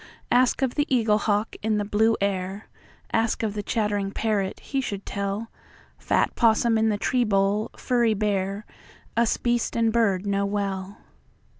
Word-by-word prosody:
Ask 250 +2 +3
of 255 -2 +1
the 290 0 0
eaglehawk 215 -3 +1
in 215 0 +1
the 205 - -1
blue 220 +2 +2
air, 195 +1 -2 0.4
Ask 225 0 +1
of 215 -2 -1
the 210 - -3
chattering 205 -2 -1
parrot, 200 -2 -1
he 275 - -2
should 200 -6 -5
tell; 200 +3 -3 0.5
Fat - - +1
possum 230 0 +3
in 220 0 +3
the 210 - 0
tree 250 +4 +1
bole, 200 0 +1
furry 235 -3 +1
bear, 200 0 -1 0.5
Us 230 0 +2
beast 240 -1 0
and 225 -1 +2
bird 205 -5 +2
know 200 0 0
well. 200 -1 -3
210 Hz, 155 wpm, -25 LUFS, 200-230 Hz, 0.5 s, Ask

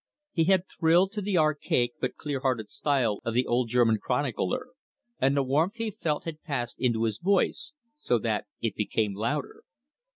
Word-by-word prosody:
He 165 -2 +2
had 190 0 +3
thrilled 175 +4 +3
to 210 -1 -4
the 200 -2 0
archaic 150 -6 +2
but - - -1
clear 145 -3 -3
hearted 125 -5 -1
style 125 -8 +1
of 115 -1 -2
the 125 +1 +3
old 120 0 +1
German 115 -2 +3
chronicler, 125 - -1 0.5
and 135 +2 +2
the 140 - +3
warmth 155 - +1
he 225 -2 -2
felt 155 -6 -2
had 160 -2 -6
passed 125 -6 -4
into 115 -3 +1
his 110 -2 -1
voice, 200 - +1 0.2
so 210 - +1
that 105 -2 -1
it 115 -3 -1
became 105 0 -1
louder. 120 +8 -3
135 Hz, 175 wpm, -28 LUFS, 115-165 Hz, 0.5 s, had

